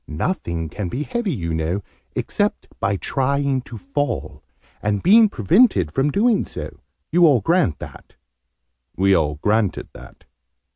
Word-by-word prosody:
Nothing 85 - -3
can 100 +5 -5
be 130 +11 -3
heavy, 240 0 -2
you 85 - -3
know, 80 +5 -2 0.3
except - - -1
by 100 +1 0
trying 140 +3 0
to 120 -2 -10
fall, 140 +1 -3 0.4
and 105 -1 -1
being 220 +3 +6
prevented 115 - +3
from 135 - +1
doing 220 - +2
so. - - -8 0.3
You 175 0 +5
all 140 -5 +4
grant 165 - +2
that?" - - -11 0.8
We 95 +1 +4
all 75 -4 +1
granted 105 +5 0
that. - - -14
120 Hz, 140 wpm, -21 LUFS, -, 0.8 s, being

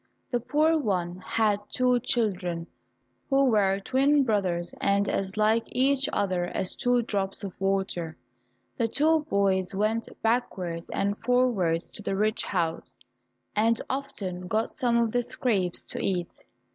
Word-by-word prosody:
The 245 - +1
poor 310 +6 +2
one 180 - -1
had 210 +2 +1
two 250 -1 +2
children, 185 -8 -1 0.6
who 275 0 +4
were 195 -2 +3
twin 275 +7 +3
brothers 185 -7 -1
and 200 0 +2
as 195 +1 -2
like 220 +2 +3
each 270 +1 +1
other 185 -3 0
as 180 +1 -2
two 245 -2 +1
drops 195 -3 -2
of 195 -3 -5
water. 190 -4 -1 0.6
The 230 - +2
two 315 +7 +3
boys 190 -3 +1
went 215 +3 0
backwards 185 -8 -1
and 200 +1 0
forwards 225 -9 +1
to - - -8
the 195 - -2
rich 215 +2 +1
house, 165 -3 -2 0.6
and 225 +2 +3
often 190 -10 -4
got 220 +4 0
some 245 -5 +1
of 230 -1 +2
the 245 - +2
scraps 200 -7 0
to - - -3
eat. 180 -3 -1
210 Hz, 145 wpm, -27 LUFS, 185-245 Hz, 0.6 s, who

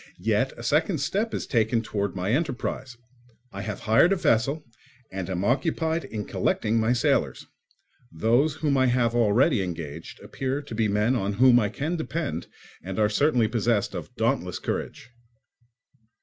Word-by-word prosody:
Yet 115 +5 +1
a 120 - -8
second 155 - +1
step 200 +11 -1
is - - -3
taken 115 -1 +1
towards 100 -5 -3
my 95 +2 -1
enterprise. 130 -3 -2 0.6
I 100 - -5
have 105 0 -5
hired 115 - +4
a - - +4
vessel 140 - +1 0.5
and 95 -1 -5
am 95 +1 -2
occupied 160 +5 0
in 110 -6 -5
collecting 110 +2 0
my 110 +1 +2
sailors; 125 - +1 0.7
those 120 - +2
whom 150 -3 0
I 130 0 +4
have 120 -1 +2
already 120 +2 +3
engaged 80 -4 -6
appear 135 +2 -3
to 140 - -9
be 110 0 +1
men 105 +5 +1
on 100 -4 -1
whom 120 +3 +6
I 105 -3 0
can 160 - -3
depend 160 - -3 0.3
and 95 +1 -6
are 105 -1 +3
certainly 125 0 +2
possessed 115 -1 0
of - - -7
dauntless - - 0
courage. 120 - -5
120 Hz, 160 wpm, -26 LUFS, 105-140 Hz, 0.7 s, whom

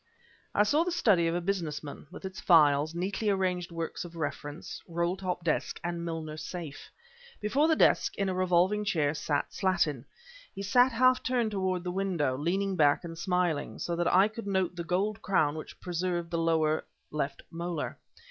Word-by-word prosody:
I 210 - +5
saw 295 +10 +3
the 360 - -2
study 205 - +3
of 165 - 0
a 175 - 0
business 170 -5 -2
man, 145 0 -9
with - - -10
its 190 +2 -6
files, 155 -2 +4
neatly 195 +4 -1
arranged 185 -3 0
works 165 -1 -4
of 170 -1 -10
reference, 145 0 -5
roll 170 +1 0
top 185 -2 -3
desk, 160 -2 -1
and 170 -1 -3
Milner 160 -2 -4
safe. 165 -3 -7 0.5
Before 270 +9 +2
the 320 - +4
desk, - - +3
in 200 - 0
a 190 - 0
revolving 185 +3 +2
chair, 160 -8 +1
sat 150 -2 -2
Slattin. 160 -9 0 0.5
He 195 - -5
sat 245 +6 +4
half 255 +2 +4
turned 240 -4 0
toward 190 -3 -1
the 180 - -3
window, 180 -8 0
leaning 190 +7 0
back 145 -2 +3
and 165 -1 -7
smiling; 175 -3 -1
so 170 - -2
that 175 0 +1
I 190 +3 +6
could 220 0 -8
note 190 -2 0
the 170 - -4
gold 195 +5 -1
crown 155 -7 +2
which 155 - -8
preserved 175 -1 -2
the 170 - 0
lower 160 -1 +2 0.3
left 140 -2 -3
molar. 170 -1 -4
175 Hz, 185 wpm, -29 LUFS, 165-195 Hz, 0.5 s, I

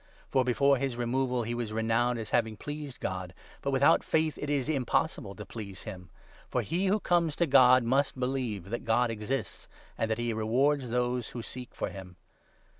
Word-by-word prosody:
For, 130 - +3
before 140 +3 +3
his 130 -2 -2
removal, 125 0 0
he 120 +2 -3
was 120 -2 -3
renowned 115 +2 +1
as 110 -2 -6
having 110 -2 +1
pleased 145 -1 -6
God; 95 -2 -4 0.3
but 140 - -1
without 135 0 +4
faith 160 -1 +1
it 145 - -3
is 140 -3 0
impossible 140 - 0
to 105 - -8
please 100 -4 -8
him, 90 -5 -8 0.4
for - - 0
he 180 +5 0
who 205 +3 +3
comes 170 -5 +1
to 170 - +2
God 130 -3 +6
must 135 +2 +1
believe 125 -7 -2
that 120 - -3
God 120 0 +2
exists, 115 +5 -4 0.3
and 115 - 0
that 110 - 0
he 120 -1 -1
rewards 125 +5 +1
those 125 0 0
who 120 - -6
seek 125 +1 -8
for - - -2
him. 95 -2 -10
125 Hz, 190 wpm, -29 LUFS, 110-140 Hz, 0.4 s, God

